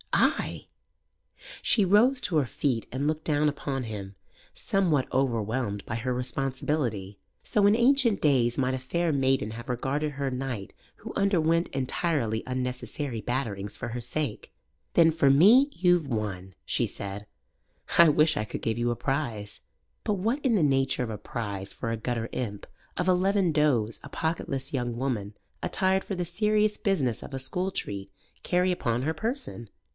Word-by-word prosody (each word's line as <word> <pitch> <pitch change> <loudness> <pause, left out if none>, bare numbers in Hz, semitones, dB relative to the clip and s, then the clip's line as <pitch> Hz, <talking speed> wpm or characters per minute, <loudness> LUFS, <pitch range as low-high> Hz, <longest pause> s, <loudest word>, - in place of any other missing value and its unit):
"Ay!" - - +1 1.0
She 210 -5 +4
rose 230 +8 +4
to 165 - 0
her 145 - +3
feet 120 -1 -1
and 135 +3 -1
looked 155 0 -1
down 150 -1 +2
upon 140 -2 -2
him, 100 -4 -6 0.4
somewhat 170 -9 +1
overwhelmed 115 -4 0
by 110 - -4
her 125 +2 -1
responsibility. 125 -5 -2 0.2
So 205 -2 +2
in 205 - +5
ancient 240 -2 +3
days 125 -5 +3
might 130 -1 +1
a 130 - -2
fair 165 +6 0
maiden 135 -5 +1
have 120 +4 -8
regarded 140 +5 -1
her 140 0 -2
knight 125 -6 -4 0.2
who - - -8
underwent 170 -4 +2
entirely 135 -4 -1
unnecessary 125 -1 -3
batterings 105 -6 -3
for - - -4
her 120 +1 -4
sake. 125 0 -3 0.4
"Then 165 -1 +6
for 155 -3 +3
me 215 - +7
you've 175 - +2
won," 95 -6 -4
she - - +1
said. 100 +1 -6 0.7
"I 170 -1 +9
wish 155 +1 +3
I 105 - 0
could - - -6
give 115 +1 -1
you 120 0 +1
a - - -1
prize." 120 -7 -3 0.4
But 210 - +1
what 225 +9 -1
in 245 -4 +3
the 185 - +3
nature 135 -2 +2
of 115 - -4
a 105 - -4
prize 100 -3 -5
for 115 - -4
a 115 - -1
gutter 115 0 -2
imp 105 -5 -4 0.3
of 180 - 0
eleven 185 0 +3
does 135 -8 +2
a 140 - -9
pocketless 140 -4 -3
young 120 -3 -2
woman 110 -6 -2 0.3
attired 190 0 +1
for 195 - -4
the 180 -1 -2
serious 210 +4 +1
business 140 - 0
of 135 - -7
a - - -3
school 180 +8 -2
treat 100 - -5 0.3
carry 180 +1 +2
upon 125 -8 -1
her 160 +3 0
person? 220 - -4
135 Hz, 165 wpm, -27 LUFS, 115-170 Hz, 1.0 s, I